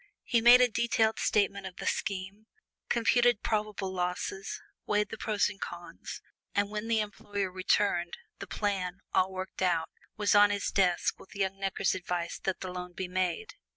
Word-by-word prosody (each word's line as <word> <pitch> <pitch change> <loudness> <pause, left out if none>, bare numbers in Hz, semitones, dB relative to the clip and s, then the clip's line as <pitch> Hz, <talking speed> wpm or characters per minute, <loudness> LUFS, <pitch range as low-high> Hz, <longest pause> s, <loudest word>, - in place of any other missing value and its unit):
He 235 -2 +2
made 240 +2 +9
a 250 - +6
detailed 230 -1 +1
statement 200 -2 +1
of 185 - -10
the - - -7
scheme, 200 +2 -3 0.4
computed 240 -1 +3
probable 210 -3 -1
losses, 180 +2 -3 0.3
weighed 210 0 +1
the 225 - -6
pros 210 -2 +1
and 205 -1 -8
cons, - - -7 0.3
and 205 0 +1
when 210 +1 -3
the 225 -1 +2
employer 205 -2 -3
returned, 185 -1 +1 0.2
the - - -6
plan, 195 -3 -2
all 185 +1 +3
worked 190 0 -6
out, 175 -3 +1 0.3
was 205 -2 +2
on 205 0 +7
his 205 -1 -1
desk, 180 -3 +2
with 190 - -15
young 195 -1 -1
Necker's 195 0 0
advice 180 -2 -3
that 190 - -1
the 185 - -4
loan 180 0 -6
be 185 +1 -4
made. 180 -2 -1
195 Hz, 170 wpm, -30 LUFS, 185-210 Hz, 0.4 s, made